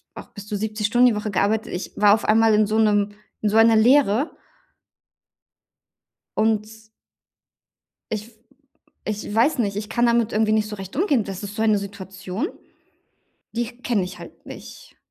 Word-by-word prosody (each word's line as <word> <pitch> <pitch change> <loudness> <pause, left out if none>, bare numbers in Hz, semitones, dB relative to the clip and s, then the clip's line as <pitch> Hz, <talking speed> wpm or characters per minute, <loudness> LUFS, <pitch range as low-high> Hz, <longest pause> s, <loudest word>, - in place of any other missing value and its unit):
auch - - -10
bis 205 -1 -11
zu 210 - -4
70 215 0 -2
Stunden 245 +3 +4
die 220 - -1
Woche 210 0 -3
gearbeitet. 210 +3 0
Ich 180 - -5
war 205 0 +5
auf 215 - -6
einmal 220 0 +4
in 215 0 +4
so 215 +2 0
'nem 205 -1 +2 0.3
in 210 - +1
so 220 - +1
einer 225 0 +6
Leere. 250 +3 +3 2.0
Und 220 0 0 1.3
Ich 215 +2 -4 0.8
ich 210 0 -4
weiß 260 +6 +3
nicht. 200 -3 -1
Ich 210 0 -6
kann 240 +2 0
damit 235 -1 +2
irgendwie 215 0 +2
nicht 215 -1 +1
so 210 - -6
recht 195 -1 -9
umgehen. 285 - +1
Das 195 0 -7
ist 205 0 -7
so 220 - -1
eine 215 -2 +3
Situation, 195 - -5 1.0
die 235 0 -1 0.2
kenne 225 -6 0
ich 185 +1 -6
halt - - -13
nicht. - - -12
215 Hz, 165 wpm, -22 LUFS, 205-225 Hz, 2.0 s, einer